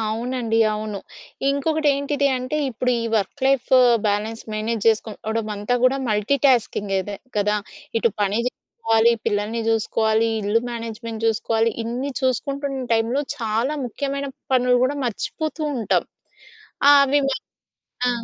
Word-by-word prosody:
అవునండి, 230 0 -1 0.2
అవును. 210 -1 -4 0.5
ఇంకొకటి 305 +2 +1
ఏంటిది 280 0 0
అంటే, 255 +4 -3
ఇప్పుడు 250 +2 -1
ఈ - - -2
వర్క్ 210 +7 -2
లైఫ్ 270 -2 +1 0.4
బ్యాలెన్స్ 215 +3 -2
మేనేజ్ 215 0 -2
చేసుకోవడం 220 0 -1
అంతా 210 +5 -1
గూడా 260 +2 +4
మల్టీటాస్కింగే 215 -3 +2
అదే 200 0 -6 0.2
కదా! 210 +1 +2 0.4
ఇటు 230 - +2
పని 205 +3 +1
చేసుకోవాలి, 225 - +1
పిల్లల్ని 210 +3 0
జూసుకోవాలి, 220 0 +2
ఇల్లు 210 +3 +2
మేనేజ్మెంట్ 230 -1 -5
జూసుకోవాలి. 225 0 +1
ఇన్ని 250 +5 -3
చూసుకుంటున్న 275 +1 -1
టైమ్‌లో 235 +6 +1 0.2
చాలా 230 +6 -1
ముఖ్యమైన 280 +3 -3 0.3
పనులు 250 0 +4
గూడా 280 +3 0
మర్చిపోతూ 310 +7 -3
ఉంటాం. 225 -5 +1 0.8
ఆ! - - +10
అవి 280 +1 +2
మ - - +1 0.8
ఆ! - - +3
230 Hz, 125 wpm, -22 LUFS, 220-270 Hz, 0.8 s, ఆ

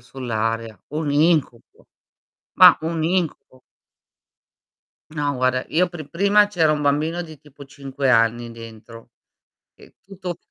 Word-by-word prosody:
sull'area"; 115 -4 -4
un 150 0 -3
incubo, 150 -6 0 0.7
ma - - +7
un 160 0 -3
incubo. 165 -6 -3 1.5
No 145 -2 -2
guarda 130 0 0
io 180 +3 +1
pri 160 -5 -10
prima 200 +6 +3
c'era 165 -6 +1
un 150 - -2
bambino 150 +4 0
di 160 -4 -10
tipo 145 -1 -15
5 135 -1 -5
anni 120 0 +2
dentro, 115 0 -13 0.6
e - - -20
tutto 185 -3 -8
145 Hz, 120 wpm, -21 LUFS, 120-165 Hz, 1.5 s, ma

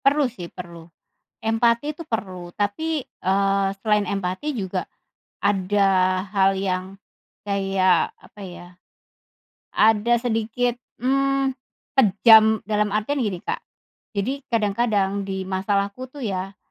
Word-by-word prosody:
Perlu 285 +1 +4
sih, 200 -9 -6
perlu. 170 -2 -10 0.6
Empati 235 +5 +2
itu 335 - -8
perlu 185 - -4
tapi, 295 +10 -1
eee, 195 -1 0
selain 210 -2 +2
empati 195 +9 -2
juga 195 -6 -3 0.6
ada 190 -1 +2
hal 195 -1 +4
yang 190 0 -3 0.5
kayak 195 -2 +2
apa 210 - -16
ya, 175 -1 -9 1.0
ada 220 +2 +4
sedikit, 230 +1 -1 0.2
mmm, 275 +1 +1 0.4
kejam, 220 -2 +6
dalam 210 0 +1
artian 215 +8 -1
gini 200 -5 -2
Kak, - - -2 0.6
jadi 260 +8 -1
kadang-kadang 205 -3 +1
di 190 -1 -3
masalahku 200 +5 -1
tuh 280 -1 -8
ya, 195 0 -4
205 Hz, 110 wpm, -23 LUFS, 190-235 Hz, 1.0 s, kejam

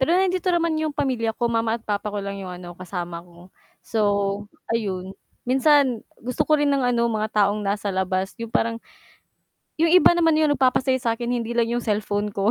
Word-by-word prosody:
Pero 265 - +2
nandito 370 -1 +1
naman 335 -2 +1
yung 315 -1 -1
pamilya 255 -6 -1
ko, 240 - 0
mama 230 0 0
at 225 - -28
papa 210 0 -2
ko 205 - -4
lang 200 0 -5
yung 185 - -6
ano, 175 -1 -9
kasama 175 -1 -6
ko. 175 +1 -18 0.3
So, 225 - -2 0.7
ayun, 190 -4 -3 0.3
minsan 265 -2 +3 0.2
gusto 250 +2 -1
ko 305 -1 +4
rin 290 -1 +2
ng 275 -1 +1
ano, 240 -1 +2
mga 215 -1 -1
taong 205 +1 +1
nasa 200 0 -1
labas. 190 0 -1
Yung 230 -1 -5
parang 230 0 0 1.0
yung 330 - +4
iba 355 +1 +6
naman 330 -2 +3
yung 310 -1 +3
nagpapasaya 260 -1 +2
sa'kin, 235 0 -1
hindi 235 +1 -4
lang 230 0 +2
yung 240 - 0
cellphone 210 -1 -1
ko, 200 +1 0
230 Hz, 190 wpm, -23 LUFS, 200-265 Hz, 1.0 s, iba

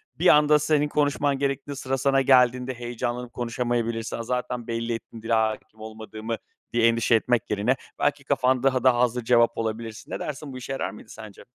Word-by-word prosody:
bir 175 - +1
anda 150 -1 +6
senin 150 0 +2
konuşman 145 -1 +1
gerektiği, 140 +1 -2
sıra 135 -1 -2
sana 135 +1 +2
geldiğinde 125 -1 +4
heyecanlanıp 120 0 -4
konuşamayabilirsin, 115 -1 -2
"A, 115 - -4
zaten 125 0 -3
belli 115 0 -2
ettim 115 0 -8
dile 115 +1 -2
hâkim 110 0 -1
olmadığımı." 110 +1 -6 0.4
diye 115 -1 +4
endişe 115 0 +3
etmek 115 0 +1
yerine 105 +5 +1 0.2
belki - - 0
kafan 130 0 +1
daha 130 -2 +2
da 130 -2 +5
hazır 125 0 +1
cevap 115 0 +3
olabilirsin. 115 0 -5
Ne - - -3
dersin 145 -1 -6
bu - - -7
işe 130 +1 -7
yarar 135 - -2
mıydı 105 +2 -13
sence? 110 -3 -11
120 Hz, 180 wpm, -25 LUFS, 115-135 Hz, 0.4 s, anda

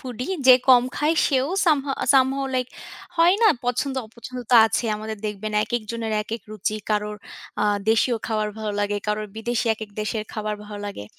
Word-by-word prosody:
Foodie. 250 -2 -6 0.2
যে 255 - +10
কম 245 -2 +8
খায়, 305 +2 +2
সেও 270 +1 +1 0.2
সাম 310 -4 +4 0.2
আ - - 0
Somehow 270 +1 +3
লাইক 255 -1 0 0.5
হয় 340 +3 +5
না, 440 - +7 0.2
পছন্দ 255 +3 -1
অপছন্দ 240 +3 -10
তো 245 - +5
আছেই। 225 +2 -1
আমাদের 215 0 -6
দেখবেন, 210 +1 -4
একেকজনের 225 0 -3
একেক 220 0 -6
রুচি। 215 0 -2
কারোর 210 0 -1 0.5
আ - - +3 0.3
দেশীয় 230 +2 +2
খাবার 215 -1 -1
ভালো 215 -1 -3
লাগে, 205 0 0
কারো 210 0 -1
বিদেশী, 235 +1 -2
একেক 215 -1 -9
দেশের 215 0 -2
খাবার 215 -1 -3
ভালো 205 0 -8
লাগে। 195 - -7
225 Hz, 175 wpm, -23 LUFS, 215-255 Hz, 0.5 s, যে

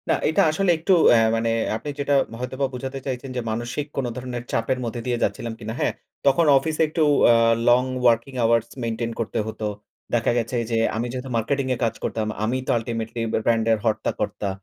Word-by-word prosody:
না, - - +5 0.2
এটা 160 - +3
আসলে 185 +3 +2
একটু 165 +5 -1 0.2
অ্যা 120 - +6 0.2
মানে 115 0 0 0.3
আপনি 115 +7 -5
যেটা, 145 0 0 0.3
হয়তোবা 130 +2 -2
বুঝাতে 130 +2 -5
চাইছেন 130 0 -4
যে - - 0
মানসিক 120 +6 -3
কোন 135 - 0
ধরনের 125 -1 -5
চাপের 115 +3 0
মধ্যে 120 +1 -4
দিয়ে 120 -1 0
যাচ্ছিলাম 120 -3 -2
কিনা। 110 -1 -5
হ্যাঁ, - - +1 0.3
তখন 140 +4 +4
অফিসে 155 +4 -1
একটু 160 +2 -2 0.2
অ্যা 120 - +7 0.3
long 125 +2 +5 0.2
working 120 +3 +1
hours 115 0 +3 0.2
maintain 115 0 -2
করতে 115 0 -2
হতো। 110 0 -5 0.5
দেখা 120 0 +2
গেছে 115 +1 -2 0.2
যে, 115 - +1 0.2
আমি 115 +2 -1
যেহেতু 130 +1 -5
মার্কেটিং 135 +5 0
এ - - -8
কাজ 115 - 0
করতাম, 110 -1 -2 0.2
আমি 120 +4 0
তো - - +2
আল্টিমেটলি 115 0 -4
ব্যা - - 0
ব্র্যান্ড 115 -1 +2
এর 110 - +4
হর্তাকর্তা। 105 -2 -1
120 Hz, 195 wpm, -23 LUFS, 115-135 Hz, 0.5 s, অ্যা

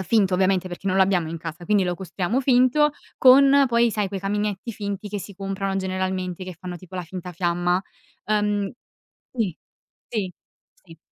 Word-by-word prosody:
ehm, - - -1
finto 195 -2 +2
ovviamente 185 0 +2
perché 175 +2 -8
non 190 0 +1
lo 195 - +6
abbiamo 185 -4 +1
in 165 - -4
casa, 165 +2 -7
quindi 205 -1 +3
lo 180 -1 -1
costruiamo 190 +5 -2
finto, 260 +3 +4 0.3
con 275 +2 +7
poi, 235 0 +3
sai, 210 -2 -1
quei 195 0 -4
caminetti 205 +2 -2
finti 200 0 -5
che 205 - -3
si 200 - -9
comprano 195 0 -3
generalmente 185 -1 -2
che 185 -1 -7
fanno 180 0 -6
tipo 185 +1 -13
la 180 - -3
finta 180 +1 -7
fiamma. 175 +1 0 0.4
Uhm 210 -1 0 0.6
sì, 215 -9 -1 0.5
sì, 200 -5 -2 0.5
sì. 165 -3 -15
195 Hz, 180 wpm, -24 LUFS, 180-210 Hz, 0.6 s, con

